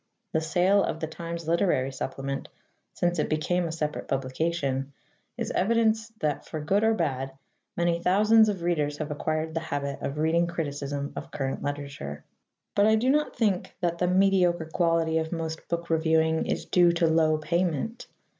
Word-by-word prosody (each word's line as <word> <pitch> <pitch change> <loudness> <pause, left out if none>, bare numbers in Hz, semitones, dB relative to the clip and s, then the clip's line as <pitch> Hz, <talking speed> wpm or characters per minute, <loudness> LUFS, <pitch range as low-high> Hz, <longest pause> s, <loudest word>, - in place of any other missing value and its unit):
The 160 - +2
sale 180 +5 +3
of 160 - -2
the 160 - -2
Times 170 0 -6
Literary 165 -6 +2
Supplement, 135 +1 -4 0.4
since 175 -1 0
it - - 0
became 170 +3 0
a - - -4
separate 155 -2 -3
publication, 135 0 -1 0.4
is - - -2
evidence 220 +2 +2
that, 150 -2 0
for 155 - -6
good 195 +8 +1
or 225 0 +4
bad, 135 -7 -2 0.4
many 170 0 +1
thousands 215 +5 +5
of 190 -5 -3
readers 150 -4 0
have 150 -1 -4
acquired 155 +2 -2
the 165 - 0
habit 140 -3 -4
of 140 +1 -3
reading 165 +2 +2
criticism 145 -4 -3
of - - -6
current 135 -1 -3
literature. 140 - -5 0.5
But 205 +1 +4
I 220 - +5
do 245 +4 +2
not 300 +1 +1
think 205 -6 0
that 170 -1 0
the 180 - +2
mediocre 180 -2 +3
quality 165 -2 +2
of 160 0 -3
most 160 -1 -4
book 170 0 -3
reviewing 160 0 +2
is - - -2
due 175 -1 +4
to 170 0 +2
low 160 -1 +3
payment. 170 - -1
165 Hz, 170 wpm, -27 LUFS, 150-180 Hz, 0.5 s, thousands